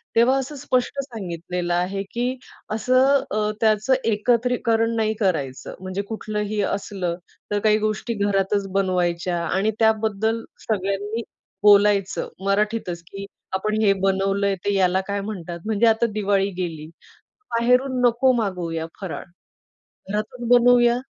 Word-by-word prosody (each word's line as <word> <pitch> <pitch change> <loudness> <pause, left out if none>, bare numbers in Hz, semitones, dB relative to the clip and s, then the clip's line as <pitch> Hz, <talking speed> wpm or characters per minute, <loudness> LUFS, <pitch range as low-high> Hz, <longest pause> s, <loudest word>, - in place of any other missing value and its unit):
तेव्हा 240 +4 +5
असं 275 +3 -5
स्पष्ट 265 -1 -1
सांगितलेलं 180 -6 -4
आहे, 190 +3 -1
की 245 +2 -1 0.4
असं 260 +5 +3
अ, 210 0 0
त्याचं 215 +3 +3 0.2
एकत्रीकरण 230 0 +1
नाही 220 -1 +1
करायचं. 150 - -1
म्हणजे 185 +1 -4
कुठलंही 210 -1 -2
असलं 195 -3 -2 0.4
तर 205 - +1
काही 215 0 +3
गोष्टी 215 +2 -3
घरातच 200 -1 0
बनवायच्या 180 -2 0
आणि 195 +5 +1
त्याबद्दल 220 0 +1 0.3
सगळ्यांनी 205 +2 -1 0.4
बोलायचं 205 -1 +4 0.2
मराठीतच 200 -3 0
की 195 +2 -7 0.3
आपण 215 +3 0
हे 200 -2 +5
बनवलंय. 195 +1 +1
ते 205 - +1
याला 190 -1 +3
काय 200 0 -2
म्हणतात. 180 -5 -6
म्हणजे 220 +1 +2
आता 225 +1 +3
दिवाळी 200 -2 +1
गेली. 165 -4 -4 0.7
बाहेरून 250 +3 +2
नको 245 +2 +4
मागवूया 175 -7 -2 0.2
फराळ, 190 -4 -5 0.9
घरातून 215 +4 -3
बनवूया 245 0 +5
210 Hz, 120 wpm, -23 LUFS, 195-230 Hz, 0.9 s, तेव्हा